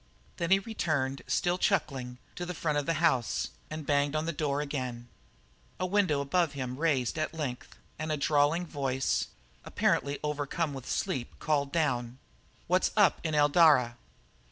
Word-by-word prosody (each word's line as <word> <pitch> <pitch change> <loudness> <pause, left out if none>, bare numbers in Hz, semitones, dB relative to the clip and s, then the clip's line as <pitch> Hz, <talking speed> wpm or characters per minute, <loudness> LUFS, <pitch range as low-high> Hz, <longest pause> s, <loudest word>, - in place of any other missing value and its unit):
Then 170 -2 -1
he 195 - +6
returned, 155 -10 -2
still 175 +1 +1
chuckling, 130 -12 0 0.2
to 180 - -5
the 180 0 -4
front 150 -3 0
of 145 - -5
the 165 - +1
house, 130 - +1 0.2
and 155 -1 -6
banged 145 0 +1
again - - +2
on 155 - -3
the 170 - -2
door. 145 -1 -1 1.1
A 185 - 0
window 185 -7 +2
above 155 +2 +1
him 130 -2 -4
raised 150 -3 +1
at 155 +1 -2
length 135 -6 -5 0.2
and 155 0 -2
a 155 - 0
drawling 150 +4 +2
voice, 135 -4 -1 0.4
apparently 140 0 0
overcome 150 +1 -2
with 135 -2 -8
sleep, 120 -2 -2
called 140 -2 0
down: 125 -7 0 0.5
"What's 185 +2 +2
up 205 -3 +4
in 155 -2 -1
Eldara?" 145 -5 +5
150 Hz, 155 wpm, -30 LUFS, 135-165 Hz, 1.1 s, he